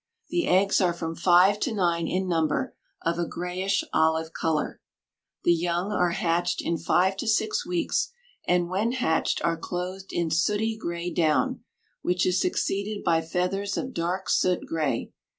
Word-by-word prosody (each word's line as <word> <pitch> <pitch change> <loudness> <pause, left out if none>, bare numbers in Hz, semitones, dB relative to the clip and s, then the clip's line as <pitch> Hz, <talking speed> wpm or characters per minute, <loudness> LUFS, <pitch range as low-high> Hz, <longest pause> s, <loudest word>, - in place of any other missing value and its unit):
The 345 0 0
eggs 195 +3 +3
are 180 -2 +3
from 165 -1 -4
five 180 +4 +5
to 260 - -1
nine 170 -4 +1
in 185 +1 -1
number, 165 -3 0 0.3
of 170 +1 0
a 170 - 0
grayish 185 +3 -1
olive 160 0 +2
color. 160 -2 -1 0.6
The 175 - +5
young 175 +3 -1
are 180 -4 +2
hatched 170 0 0
in 170 -1 -1
five 185 +4 +2
to 230 - -4
six 220 +4 +1
weeks, 355 +6 0 0.4
and 175 -1 +2
when 205 +7 0
hatched 205 -11 0
are 165 0 +1
clothed 180 +3 -5
in 170 -2 -1
sooty 210 +7 +1
gray 170 -4 -4
down, 155 -3 +1 0.4
which 180 +1 +1
is 185 0 +2
succeeded 200 +3 -1
by 165 -2 +3
feathers 180 +4 -2
of 260 0 -3
dark 180 0 -2
soot 180 -1 +2
gray. 155 -3 -2
180 Hz, 160 wpm, -26 LUFS, 170-195 Hz, 0.6 s, five